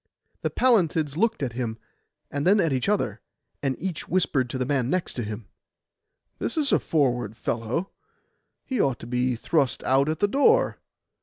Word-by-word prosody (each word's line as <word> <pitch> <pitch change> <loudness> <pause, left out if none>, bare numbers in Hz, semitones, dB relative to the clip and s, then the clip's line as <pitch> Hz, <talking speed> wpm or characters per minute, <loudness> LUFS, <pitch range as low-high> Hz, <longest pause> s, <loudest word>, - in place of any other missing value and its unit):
The - - 0
Pallantids 165 - +2
looked 225 -1 +1
at 125 -3 -2
him, 115 -2 -3 0.5
and 145 0 -2
then 205 +3 +5
at 165 -7 +2
each 130 +7 0
other, 210 - 0 0.4
and 135 -2 0
each 180 -4 -4
whispered 145 -8 +1
to 130 - -3
the 130 - -1
man 130 -2 0
next 185 -4 -1
him, 110 -2 -5 0.9
'This - - -3
is 290 -3 +2
a - - +4
forward 120 -8 0
fellow; 120 - -2 0.7
he 255 -6 0
ought 135 -3 +1
to - - -7
be 125 +1 0
thrust 135 +1 0
out 135 +3 +3
at 155 - -1
the 205 - +2
door. 445 - +3
140 Hz, 170 wpm, -25 LUFS, 125-185 Hz, 0.9 s, then